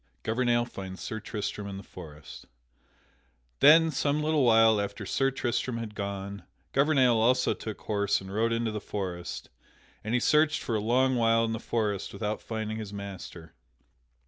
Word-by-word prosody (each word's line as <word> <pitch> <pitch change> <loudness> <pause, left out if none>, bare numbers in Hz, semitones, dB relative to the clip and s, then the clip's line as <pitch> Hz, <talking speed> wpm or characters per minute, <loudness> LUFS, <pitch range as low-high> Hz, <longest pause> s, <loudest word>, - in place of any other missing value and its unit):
[Sidenote: - - -41
Gouvernail 120 +1 +1
finds 95 -5 -8
Sir 110 - -4
Tristram 105 -2 -5
in 100 -1 -6
the 100 - -9
forest] 75 -6 -11 1.1
Then, 160 +2 +7
some 145 +1 0
little 155 -2 +2
while 115 -3 +5
after 100 +1 -5
Sir 135 +7 +1
Tristram 125 -2 -2
had 115 -2 -6
gone, 100 -1 -5 0.3
Gouvernail 135 -4 +4
also 125 +3 +3
took 110 -2 -7
horse 100 -1 0
and 95 0 -9
rode 115 +2 +1
into 115 -1 0
the 105 -1 -4
forest, 90 -4 -5 0.5
and 110 +3 -1
he - - +3
searched 155 +4 +3
for 115 - -3
a 110 - +1
long 125 +4 +2
while 115 0 +3
in 115 - -2
the 110 - -3
forest 105 -5 -2
without 105 +1 -3
finding 110 -1 -4
his 110 -2 -6
master. 95 -5 -8
110 Hz, 170 wpm, -28 LUFS, 100-125 Hz, 1.1 s, Then